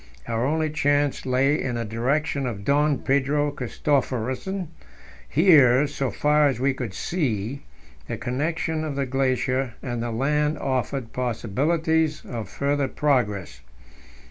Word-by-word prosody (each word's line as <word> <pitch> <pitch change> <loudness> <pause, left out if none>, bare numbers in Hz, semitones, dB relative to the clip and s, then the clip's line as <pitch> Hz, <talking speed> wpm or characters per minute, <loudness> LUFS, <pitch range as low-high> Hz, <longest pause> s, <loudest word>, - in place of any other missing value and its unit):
Our 115 +3 0
only 155 +1 0
chance 145 -2 +1
lay 135 +4 +2
in 125 -2 -2
the 115 0 -2
direction 135 +5 -1
of 100 -4 -5
Don 145 0 +3
Pedro 140 +2 +1
Christophersen; 140 - -2 0.6
here, 145 -5 +6
so 140 -2 -2
far 150 +6 +3
as 135 -4 -1
we 135 +1 +2
could 120 -7 -5
see, 130 - -2 0.5
the - - -4
connection 160 +5 -2
of 150 -3 -3
the 140 -1 0
glacier 130 -1 0
and 120 -3 -3
the 120 - -2
land 150 +6 0
offered 130 -2 -2
possibilities 155 - 0
of 115 -6 -6
further 140 +2 0
progress. 125 - 0
135 Hz, 130 wpm, -24 LUFS, 125-150 Hz, 0.6 s, here